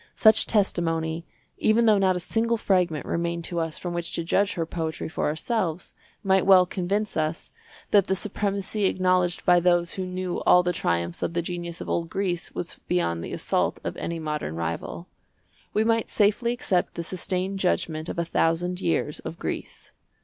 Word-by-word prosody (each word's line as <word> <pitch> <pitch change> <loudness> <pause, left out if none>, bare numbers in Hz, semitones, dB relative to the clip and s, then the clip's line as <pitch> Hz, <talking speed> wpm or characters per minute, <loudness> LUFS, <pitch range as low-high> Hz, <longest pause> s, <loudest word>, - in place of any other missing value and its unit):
Such 220 -1 +5
testimony, 165 -5 0 0.3
even 225 +2 +3
though 215 -2 +5
not 190 -1 +3
a - - -1
single 230 +6 0
fragment 180 -8 +1
remained 170 0 -2
to 170 +1 -2
us 165 -1 -2
from 175 -1 -4
which 175 -1 -3
to 170 - -2
judge 200 +4 +2
her 165 - -2
poetry 160 -1 -4
for 160 - -2
ourselves, 170 +1 -2 0.3
might 190 -1 +3
well 185 -2 +8
convince 195 +4 -2
us 155 +1 -2 0.4
that 200 -3 +5
the 190 - +1
supremacy 200 +1 -2
acknowledged 185 -1 +1
by 175 -1 +6
those 175 -1 +2
who 190 - -3
knew 185 -1 -3
all 180 - +6
the 180 0 0
triumphs 85 - -1
of - - -1
the 170 - 0
genius 170 -1 -5
of - - -6
old 165 -1 -1
Greece 185 -3 -2
was - - -4
beyond 85 -1 0
the - - -6
assault - - 0
of - - -3
any 170 - -3
modern 150 - -3
rival. 85 - -4 0.6
We 215 - +2
might 225 0 +1
safely 215 +3 +2
accept 200 -7 0
the 170 - -3
sustained 185 +2 -2
judgment 170 -3 -1
of - - -5
a 170 - 0
thousand 175 +2 0
years 160 -2 0
of 165 - -7
Greece. - - -6
175 Hz, 180 wpm, -25 LUFS, 165-195 Hz, 0.6 s, well